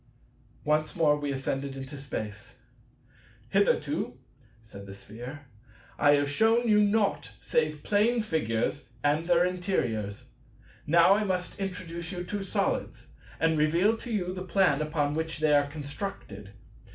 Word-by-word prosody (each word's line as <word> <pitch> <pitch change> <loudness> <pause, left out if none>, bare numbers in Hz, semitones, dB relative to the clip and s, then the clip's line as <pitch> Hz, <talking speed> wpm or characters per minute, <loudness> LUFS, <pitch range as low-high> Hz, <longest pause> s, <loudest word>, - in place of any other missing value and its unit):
Once 155 +1 +1
more 155 -3 +4
we 145 -1 -3
ascended 135 0 -3
into 135 +2 -7
space. 125 -3 -6 0.9
"Hitherto," 155 -6 +1 0.5
said 100 -3 -11
the 100 - -9
Sphere, 125 +8 -9 0.5
"I 145 -1 +6
have 145 0 +1
shewn 225 +10 +3
you 210 -1 +5
naught 205 0 +1
save 155 -2 0
Plane 220 +3 +2
Figures 140 - -1 0.2
and 150 +3 +1
their 175 0 +4
interiors. 125 - -2 0.6
Now 170 +4 +6
I 210 +2 +2
must 185 -2 -2
introduce 180 -3 -5
you 175 -2 -4
to 195 +2 -4
Solids, 195 - -2 0.3
and 160 0 +2
reveal 170 +8 +3
to 240 - -7
you 185 -4 -1
the 185 - -6
plan 180 -5 +2
upon 150 -1 0
which 160 +1 -2
they 155 0 +2
are 145 0 +4
constructed. 145 - -7
155 Hz, 140 wpm, -28 LUFS, 140-185 Hz, 0.9 s, I